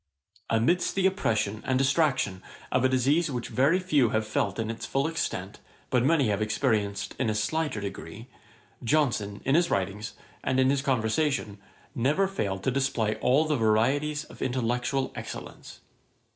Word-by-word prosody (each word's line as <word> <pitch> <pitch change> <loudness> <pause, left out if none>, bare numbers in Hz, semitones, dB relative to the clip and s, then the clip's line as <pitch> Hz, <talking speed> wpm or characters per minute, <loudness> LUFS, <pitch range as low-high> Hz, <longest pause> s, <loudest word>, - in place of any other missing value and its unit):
Amidst 125 +11 +2
the 195 -1 +1
oppression 110 - 0
and 130 - +1
distraction 135 - +1 0.3
of - - +2
a 130 - +4
disease 140 +6 +2
which 125 -3 -4
very 140 +7 +3
few 150 -10 +2
have 110 0 0
felt 100 -2 -1
in 115 -1 -2
its 115 - -8
full 135 0 0
extent, 105 - -3 0.3
but 125 -2 +3
many 140 -4 +3
have 105 0 0
experienced 105 -2 0
in 130 - +1
a 110 - 0
slighter 130 +3 -1
degree, 100 +2 -7 0.6
Johnson, 115 -7 0
in 135 - +2
his 170 +2 +3
writings, 100 +2 -2 0.3
and 130 - +1
in 130 0 +4
his 140 -1 +1
conversation, 125 -3 0 0.3
never 150 +11 +2
failed 100 - -3
to 130 - +1
display 125 -5 0
all 140 +5 +3
the 155 -2 +1
varieties 135 +8 +1
of - - -14
intellectual 125 +1 -1
excellence. - - -8
130 Hz, 160 wpm, -27 LUFS, 110-145 Hz, 0.6 s, a